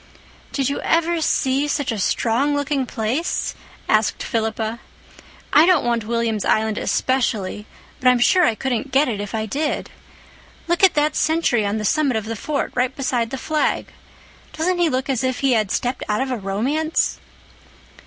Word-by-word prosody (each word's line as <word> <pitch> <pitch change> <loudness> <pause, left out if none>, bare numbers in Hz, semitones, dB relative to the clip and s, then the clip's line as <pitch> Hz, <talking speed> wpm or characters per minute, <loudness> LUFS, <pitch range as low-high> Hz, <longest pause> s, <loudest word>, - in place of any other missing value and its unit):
"Did 275 -3 0
you 280 - -2
ever 335 0 +1
see 275 -1 +1
such 285 -3 -1
a 220 - -3
strong 245 +8 +1
looking 285 -2 -1
place?" 240 +11 -2 0.3
asked 215 0 +1
Philippa. 220 0 -2 0.7
"I 310 +3 +7
don't 360 -8 +4
want 235 -2 0
William's 230 -3 0
Island 220 -1 +1
especially, 220 -6 -1 0.3
but 255 - 0
I'm 250 0 +6
sure 360 +9 +4
I 230 - +3
couldn't 255 +2 -2
get 275 +3 +3
it 215 -5 -2
if 205 +1 -5
I 220 0 -1
did. 295 +7 -2 0.8
Look 345 +2 0
at 380 - +6
that 300 0 +1
sentry 305 -9 +1
on 205 +2 -1
the 215 - -3
summit 280 0 +2
of 220 - -4
the 225 +1 -4
fort, 285 +6 -2
right 255 +1 0
beside 250 -4 -1
the 270 - -4
flag. 310 +3 -1 0.6
Doesn't 350 +3 0
he 345 -2 +3
look 260 -1 -1
as 265 -3 -1
if 260 0 -1
he 275 -1 +3
had 215 -4 +2
stepped 250 +5 -2
out 210 - +1
of 265 0 -2
a 250 - -1
romance?" 250 +11 -1
255 Hz, 175 wpm, -21 LUFS, 220-295 Hz, 0.8 s, I